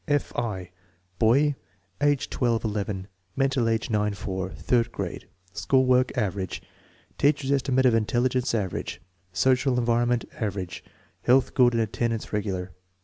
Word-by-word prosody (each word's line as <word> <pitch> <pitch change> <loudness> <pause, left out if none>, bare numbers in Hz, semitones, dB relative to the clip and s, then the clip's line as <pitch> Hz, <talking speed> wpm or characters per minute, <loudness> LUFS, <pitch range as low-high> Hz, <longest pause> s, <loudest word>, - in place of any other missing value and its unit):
F. 145 -2 0
I. 95 -6 -3 0.5
Boy, 140 +7 +4 0.5
age 145 -2 +2
18 120 -2 +1
11; 100 -3 -3 0.3
mental 135 -3 +1
age 115 0 -1
9 105 -1 +1
4; 95 -1 -4
third 120 +4 0
grade; 95 -4 -5 0.3
school 130 +5 +2
work 130 0 +3
"average"; 95 -4 -2 0.6
teacher's 140 -1 +2
estimate 130 -1 +2
of 125 - +5
intelligence 120 +3 +1
"average"; 100 -5 -3 0.3
social 130 +6 +2
en 120 - 0
vironment 120 0 +1 0.2
"average"; 95 -5 -3 0.4
health 130 +2 +3
good 125 -3 +5
and 115 -1 +2
attendance 115 +1 -2
regular. 95 -3 -2
115 Hz, 135 wpm, -26 LUFS, 105-130 Hz, 0.6 s, of